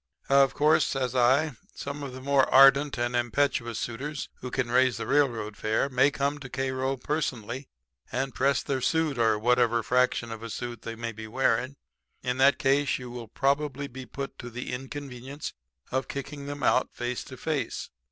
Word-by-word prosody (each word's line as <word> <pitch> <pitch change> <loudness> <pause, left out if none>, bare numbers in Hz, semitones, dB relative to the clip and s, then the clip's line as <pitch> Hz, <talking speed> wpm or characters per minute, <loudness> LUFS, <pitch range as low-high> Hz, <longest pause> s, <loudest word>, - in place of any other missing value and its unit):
"'Of 135 -1 +5
course,' 150 +2 +4
says 130 -2 -1
I, 130 +3 +3 0.2
'some 140 +1 -5
of 140 -2 -5
the 130 +1 -9
more 140 0 +3
ardent 135 +1 +7
and 120 0 -1
impetuous 120 -1 0
suitors 140 +5 -4
who 125 - -6
can 125 -1 -1
raise 130 -2 +4
the - - -4
railroad 120 -7 +1
fare 110 +6 0
may 130 +2 +4
come 140 +1 -1
to 135 -2 -9
Cairo 130 +1 -1
to 130 - -20
personally 130 -4 -3 0.6
press 140 +1 +2
their 135 -2 -1
suit 160 -2 +1
or 110 -2 +3
whatever 120 0 +3
fraction 125 -1 +1
of 115 -1 -6
a 115 - -6
suit 120 +1 -5
they 115 - -6
may 115 0 -4
be 110 0 -8
wearing. 130 +3 +1 0.5
In 125 0 -1
that 140 +1 +6
case 140 0 +2
you 125 -1 -8
will 120 -2 -7
be - - -35
probably 140 0 0 0.2
put 140 +4 -6
to 120 - -7
the 125 +1 -5
inconvenience 135 +1 -6 0.4
of 130 -1 -1
kicking 140 +1 -6
them 145 0 -5
out 130 - +3
face 120 0 -3
to 130 - -10
face. 145 -6 -3
130 Hz, 180 wpm, -27 LUFS, 120-140 Hz, 0.6 s, ardent